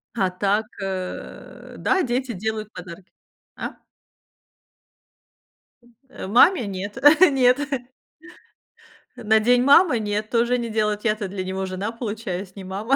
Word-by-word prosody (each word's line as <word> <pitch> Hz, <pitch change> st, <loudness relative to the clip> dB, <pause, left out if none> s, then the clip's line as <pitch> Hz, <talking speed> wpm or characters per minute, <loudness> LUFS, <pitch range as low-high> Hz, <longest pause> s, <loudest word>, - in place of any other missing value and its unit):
А 190 Hz, -4 st, +1 dB
так, 200 Hz, +4 st, 0 dB, 0.2 s
э, 185 Hz, -1 st, -7 dB
да, 380 Hz, -1 st, +1 dB
дети 250 Hz, 0 st, -2 dB
делают 215 Hz, +2 st, -4 dB
подарки. 180 Hz, +1 st, -11 dB, 0.4 s
А? -, -, -5 dB, 2.4 s
Э, -, -, -8 dB
маме 245 Hz, -, +4 dB
нет 200 Hz, +1 st, -6 dB, 0.2 s
нет. 265 Hz, -6 st, +5 dB, 1.6 s
На 220 Hz, 0 st, +2 dB
День 245 Hz, +3 st, +3 dB
мамы 280 Hz, -1 st, +5 dB
нет, 210 Hz, 0 st, -3 dB
тоже 240 Hz, +1 st, +1 dB
не 235 Hz, -1 st, -4 dB
делают. 210 Hz, -1 st, -1 dB
Я-то 215 Hz, -2 st, -1 dB
для 190 Hz, 0 st, -5 dB
него 190 Hz, +1 st, -3 dB
жена, 190 Hz, +4 st, -4 dB
получаюсь, 205 Hz, -5 st, -5 dB
не 195 Hz, -, -9 dB
мама, 205 Hz, +8 st, -1 dB
215 Hz, 120 wpm, -23 LUFS, 190-240 Hz, 2.4 s, нет